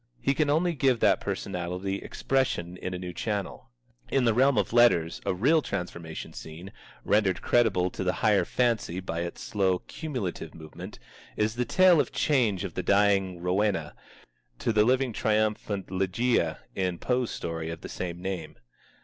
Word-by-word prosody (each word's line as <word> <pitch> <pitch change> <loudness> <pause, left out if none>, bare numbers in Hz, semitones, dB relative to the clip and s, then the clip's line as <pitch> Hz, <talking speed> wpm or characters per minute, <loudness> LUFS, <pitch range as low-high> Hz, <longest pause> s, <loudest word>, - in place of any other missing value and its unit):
He 135 - +1
can 145 +1 +1
only 170 +4 +2
give 135 -5 +2
that - - +4
personality 95 0 -3
expression 100 -9 -1
in 90 0 -5
a - - -3
new 90 -1 -6
channel. 105 +2 -4 0.4
In 135 -2 +2
the 115 - +4
realm 130 +3 +4
of 105 +1 0
letters, 105 -9 +4
a - - +2
real 145 - +3
transformation 85 - -5
scene, 85 +5 -9 0.3
rendered 105 -4 +2
credible 95 -7 +2
to - - -4
the 90 0 +1
higher 105 -2 +4
fancy 115 -8 0
by 85 -3 -4
its 85 0 -5
slow 95 -3 +1
cumulative 125 - -5
movement, 85 +5 -10 0.4
is 105 0 +1
the 125 +1 -1
tale 185 +5 +5
of - - +2
the - - -10
change 115 -10 +2
of 95 - -5
the - - -2
dying 100 -3 +2
Rowena 90 -2 0 0.6
to 115 - -1
the 105 0 +4
living 130 0 +2
triumphant 105 -3 0
Ligeia 95 -2 0
in 90 -2 -1
Poe's 125 +2 0
story 80 -1 -4
of 80 0 -6
that 90 -2 -5
name. 90 -3 -5
100 Hz, 165 wpm, -27 LUFS, 90-120 Hz, 0.6 s, tale